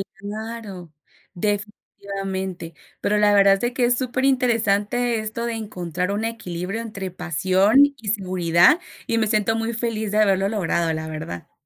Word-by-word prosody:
Claro, 205 -4 -7 0.4
definitivamente, 195 -3 -4 0.3
pero 210 - +1
la 210 0 +4
verdad 195 -1 +6
es - - -6
de 240 +2 -1
que 255 - 0
es 245 0 +3
superinteresante 245 -3 +1
esto 220 +2 -4
de 235 - -2
encontrar 180 -4 -3
un 215 +2 -2
equilibrio 200 -2 -4
entre 200 -5 -6
pasión 185 - +1 0.2
y 225 - -12
seguridad 185 - +3 0.3
y 230 - 0
me 220 -1 +2
siento 215 +1 +1
muy 225 +1 -2
feliz 225 -2 -2
de 215 - +1
haberlo 195 -2 +3
logrado, 170 -5 0
la 160 0 -4
verdad. 155 - -7
205 Hz, 150 wpm, -22 LUFS, 185-225 Hz, 0.4 s, verdad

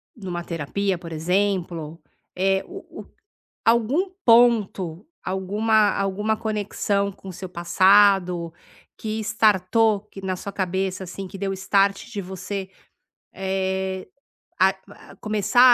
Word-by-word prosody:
numa 180 -5 -5
terapia, 180 +4 -2
por 170 -1 -10
exemplo, 170 -2 -1 0.3
eh, 190 +1 +1
o 385 +2 -8 0.2
o - - -13 0.6
algum 235 - +2 0.2
ponto, 220 -7 +3 0.2
alguma 205 +3 +2
alguma 200 +2 0
conexão 205 -2 -1
com 190 0 -10
seu 185 +1 -7
passado 180 -1 +4 0.5
que 220 0 -3
estartou, 215 0 +3
que 195 - -9
na 190 -1 -2
sua 200 +2 -6
cabeça, 190 0 -2
assim, 190 +2 -7
que 195 - -9
deu 195 0 -2
start 195 +1 +1
de 205 -4 -3
você, 190 +1 -5 0.6
eh, 190 0 -2 0.5
a - - +5 0.4
a - - -17
começar 215 +2 +1
195 Hz, 120 wpm, -23 LUFS, 185-210 Hz, 0.6 s, a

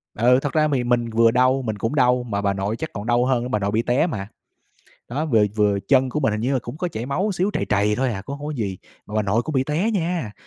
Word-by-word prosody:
Ừ. 125 +4 +4
Thật 145 - -3
ra 155 -1 +3
thì 125 - +1
mình 120 -1 +1
vừa 115 0 +4
đau, 130 +2 +3
mình 110 -4 -3
cũng 115 +7 -2
đau 125 -2 +3
mà 100 -4 -3
bà 100 -1 +1
nội 100 +3 -2
chắc 160 - -4
còn 100 +1 -6
đau 120 +1 +2
hơn 125 -2 +1
á, - - -3
bà 105 - +1
nội 100 0 -1
bị 110 - +1
té 125 +7 +1
mà. 105 - -4 0.8
Đó, 140 +6 -2
vừa 115 -8 +4
vừa 105 -2 +2
chân 130 -1 +4
của 150 +4 -2
mình 135 -6 +1
hình 105 - -2
như 125 +5 0
là 135 - +2
cũng 120 +4 -7
có 180 - -1
chảy 115 -7 -5
máu 185 +10 -1
xíu, 185 +2 0
trầy - - -1
trầy 105 +1 +2
thôi 130 -1 0
à, 95 -2 -5
cũng 140 +6 -5
hông 145 - -7
có - - -3
gì, 100 -7 -3 0.3
mà 105 - -9
bà 110 - +2
nội 105 +3 +1
cũng 155 - -5
bị 130 -1 +2
té 160 +10 0
nha. 170 - -2
120 Hz, 300 wpm, -22 LUFS, 105-140 Hz, 0.8 s, Ừ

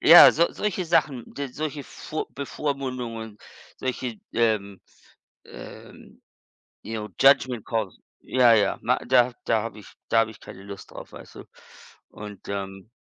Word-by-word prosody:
ja, 170 +2 +10
so 170 +2 +4
solche 195 -3 -2
Sachen, 145 -7 +2
so 140 - -2
solche 145 +1 -5
vor 155 0 -5
Bevormundungen, 130 -6 -4 0.4
solche, 125 -3 -3 0.2
ähm, 105 -4 +1 0.6
äh, - - -11 0.9
ja, 110 0 -4
Judgement 130 -4 +4
Calls, 110 -5 -2 0.2
ja, 125 -3 +5
ja, 100 -3 +3
ma 125 +2 +2
da 125 -1 +4
da 110 -1 +2
habe 110 -2 -6
ich 105 - -14 0.2
da 115 - +4
habe 110 0 -1
ich 110 - -16
keine 95 - -11
Lust 100 -1 -10
drauf, - - -10
weißt - - -12
du? - - -9 0.7
Und, 105 -1 -10
ähm 95 0 -5
115 Hz, 145 wpm, -25 LUFS, 105-135 Hz, 0.9 s, ja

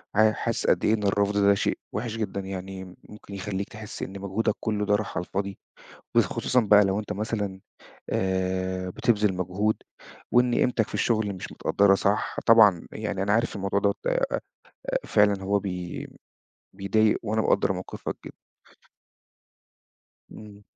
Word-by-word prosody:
حاسس 110 0 +2
قد - - +3
إيه 110 - +4
إن 105 -2 -1
الرفض 100 +1 +1
ده 100 0 +5
شيء - - 0 0.2
وحِش 115 +2 -3
جدًا 100 -3 -3
يعني، 95 0 -6 0.3
ممكن 105 -1 -12
يخليك 100 0 -4
تحس 105 -1 -8
إن 95 +1 -6
مجهودك 100 +3 0
كله 105 -2 -1
ده 105 0 +3
راح 105 -1 -3
على 90 - -2
الفاضي. 100 0 -3 0.6
وخصوصًا 125 - +2
بقى 105 -2 +6
لو 95 +2 0
أنت 105 - -4
مثلًا 105 -2 -3 0.5
آآ 95 0 -1
بتبذل 105 +1 +1
مجهود، 95 +4 0 0.6
وإن 125 0 +4
قيمتك 120 -3 +2
في - - -13
الشغل 110 -4 0
مش 90 - -8
متقدرة 100 -1 +3
صح. 100 +2 0
طبعًا 105 -7 +6
يعني 105 -3 -3
أنا 100 - +1
عارف 115 +2 +1
إن 100 - -4
الموضوع 100 +1 +1
ده 100 0 +2 0.2
آآ - - 0 0.8
فعلًا 100 -2 +3
هو 100 +1 +1
بي 90 -3 -5 0.7
بيضايق، 105 +3 +2
وأنا 110 0 0
مقدّر 95 - +2
موقفك 90 0 -6
جدًا. - - -10 2.0
إمم. 105 -1 -12
100 Hz, 150 wpm, -26 LUFS, 95-110 Hz, 2.0 s, بقى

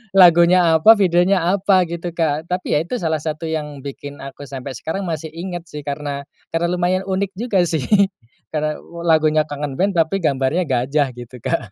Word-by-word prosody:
lagunya 175 -1 +6
apa 185 +8 +7
videonya 185 +1 +3 0.2
apa 190 -2 +3
gitu, 170 +1 -5
Kak. 160 0 -1
Tapi 180 0 -1
ya - - +4
itu 250 - -4
salah 160 -2 0
satu 155 +1 -4
yang 150 -3 -4
bikin 140 +1 -8
aku 135 +1 -9
sampai 135 0 -6
sekarang 160 +11 -4
masih 160 -1 -4
ingat 175 0 -6
sih 150 - -6
karena 140 0 -4 0.3
karena 165 +1 +1
lumayan 180 +1 0
unik 190 +1 -1
juga 225 -5 +1
sih 160 -4 -1 0.7
karena 155 0 -1 0.3
lagunya 155 -1 +3
Kangen 145 -2 -5
Band 195 0 +1
tapi 170 +4 +1
gambarnya 145 +3 0
gajah 135 +3 +1
gitu, 125 +1 -10
Kak. 110 -2 -2
160 Hz, 175 wpm, -20 LUFS, 145-180 Hz, 0.7 s, apa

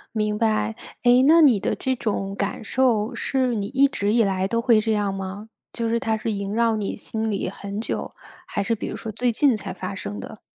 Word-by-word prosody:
明 210 -1 0
白， 220 0 +1 0.3
哎， 245 +1 +6
那 325 +3 +7
你 270 -8 +6
的 - - -1
这 260 -1 -1
种 200 -4 -2
感 200 +2 -3
受 240 -2 +1
是 255 0 0
你 200 -2 -2
一 275 +4 +4
直 205 -6 -1
以 230 -1 +4
来 190 -1 0
都 230 +4 0
会 230 -2 +4
这 225 - -1
样 205 -2 0
吗？ 195 +2 -6 0.2
就 230 -1 -2
是 230 +1 0
它 225 -4 0
是 220 0 -2
萦 200 0 -3
绕 230 0 +2
你 210 -2 -3
心 220 +1 -3
里 195 - -2
很 200 +1 -6
久， 225 - -3 0.3
还 - - -2
是 225 +3 0
比 - - -5
如 - - -5
说 225 - -6
最 245 +3 +1
近 265 +2 +3
才 200 -2 -6
发 185 +1 -5
生 105 - -6
的？ - - -9
220 Hz, 245 characters per minute, -23 LUFS, 200-235 Hz, 0.3 s, 那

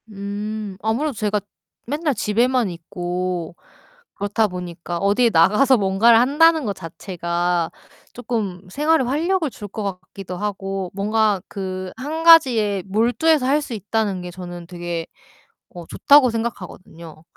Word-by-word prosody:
음. 205 0 -5
아무래도 245 +8 -1
제가 210 -1 -1 0.5
맨날 295 +3 -1
집에만 235 +2 +1
있고 175 0 -4 0.6
그렇다 205 +2 0
보니까 175 -2 -6
어디에 205 +5 +3
나가서 210 +10 +4
뭔가를 210 +3 +4
한다는 305 +4 +4
것 205 - -1
자체가 170 0 -2 0.4
쪼끔 215 -7 -4
생활에 300 - +2
활력을 320 +6 0
줄 210 -4 -9
것 210 +2 -6
같기도 185 -1 -7
하고 195 -2 -4
뭔가 210 0 +1
그 185 -1 -5
1 310 +5 -4
가지에 235 - +5
몰두해서 245 +9 +2
할 290 +3 +2
수 280 -4 -6
있다는 210 -2 -2
게 180 0 -7
저는 175 -1 -9
되게 175 -2 -5 0.6
어 175 -1 -10
좋다고 285 -3 +5
생각하거든요. 180 -8 -7
205 Hz, 280 characters per minute, -21 LUFS, 180-245 Hz, 0.6 s, 가지에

